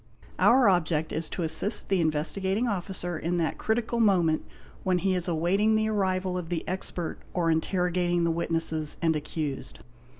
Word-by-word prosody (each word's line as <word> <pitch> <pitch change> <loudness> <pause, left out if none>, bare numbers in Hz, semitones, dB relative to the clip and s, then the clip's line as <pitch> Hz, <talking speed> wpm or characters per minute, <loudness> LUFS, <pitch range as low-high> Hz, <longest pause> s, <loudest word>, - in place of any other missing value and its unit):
Our 250 -1 +5
object 160 -4 +1
is 160 0 -2
to 175 - -3
assist 165 +7 +1
the 190 -3 +2
Investigating 190 +8 0
Officer 180 -4 -3
in 175 +2 -1
that 165 -2 -1
critical 235 +1 -1
moment 175 -8 +3 0.4
when 185 -1 +1
he 190 +1 +1
is 180 -1 0
awaiting 185 +6 +2
the 220 0 +1
arrival 185 -3 0
of 165 -2 -7
the 170 -2 -3
expert 180 -2 -4 0.2
or 170 -2 +2
interrogating" 175 +1 0
the 170 - +2
witnesses 165 -2 0
and 165 -1 +1
accused. 150 -1 -5
175 Hz, 160 wpm, -27 LUFS, 165-195 Hz, 0.4 s, Our